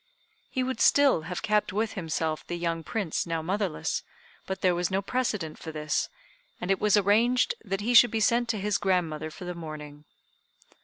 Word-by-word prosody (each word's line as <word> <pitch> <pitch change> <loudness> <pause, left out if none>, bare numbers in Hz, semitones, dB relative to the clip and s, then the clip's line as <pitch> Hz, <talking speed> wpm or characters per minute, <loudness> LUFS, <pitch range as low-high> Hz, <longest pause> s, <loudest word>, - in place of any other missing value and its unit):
He 260 - -1
would 255 -2 -3
still 280 - +5
have 180 - -4
kept 210 0 +1
with 215 +3 -1
himself 160 -3 -2
the 175 - -3
young 165 -1 -2
Prince 180 +1 -2
now 165 -1 -2
motherless, 185 - -1 0.5
but 190 0 -4
there 185 -1 +3
was 175 0 0
no 190 0 +1
precedent 200 -7 -2
for 160 - -7
this, 155 0 -1 0.5
and 180 +2 -2
it 195 - +1
was 210 -1 +4
arranged 225 +5 +3
that 195 -1 -3
he 235 +4 0
should 245 0 +8
be 225 - -1
sent 235 +2 +2
to 225 - 0
his 205 +1 0
grandmother 165 -5 0
for 170 +3 -10
the 180 - -4
mourning. 150 -3 -9
190 Hz, 190 wpm, -27 LUFS, 165-215 Hz, 0.5 s, should